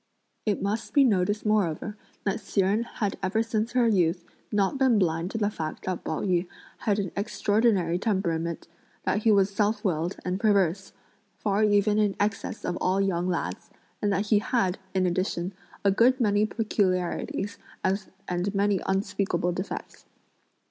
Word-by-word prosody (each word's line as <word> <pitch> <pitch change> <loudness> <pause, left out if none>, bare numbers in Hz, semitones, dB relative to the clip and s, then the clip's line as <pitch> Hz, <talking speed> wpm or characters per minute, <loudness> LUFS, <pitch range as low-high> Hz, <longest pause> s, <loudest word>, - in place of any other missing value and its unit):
It 205 -2 0
must 210 +7 -2
be 285 - +7
noticed 205 -3 +1
moreover 210 -1 +1 0.3
that 195 - 0
Hsi 195 - 0
Jen 200 +4 +2
had 215 -4 -3
ever 215 +4 +1
since 225 0 -2
her 245 -2 +4
youth 180 -5 +2 0.3
not 205 +6 +1
been 260 -4 +4
blind 170 -2 +1
to 225 - -4
the 210 -1 +1
fact 155 -5 -5
that 185 -1 -3
Pao 155 - -2
yü 180 -2 +1 0.3
had 205 -2 +1
an 195 -4 -2
extraordinary 205 -4 +1
temperament, 170 -6 -1 0.4
that 205 - +1
he 220 +1 +3
was 200 -1 +3
self 210 +1 0
willed 170 0 0
and 180 +1 -1
perverse, 195 -3 +2 0.4
far 205 +1 +1
even 210 0 +3
in 205 -2 +2
excess 205 0 -2
of 180 - -1
all 185 +1 +2
young 180 -3 +1
lads, 175 -2 -3 0.3
and 205 - +1
that 195 +2 +1
he 210 - +5
had, 205 -4 0 0.2
in 185 -1 +3
addition, 180 0 -1 0.3
a 200 - +6
good 245 +6 +4
many 210 -2 +3
peculiarities 200 -3 -1 0.2
and 190 0 -2
many 200 -1 +2
unspeakable 190 -2 0
defects. 185 +3 -6
200 Hz, 160 wpm, -27 LUFS, 185-210 Hz, 0.4 s, be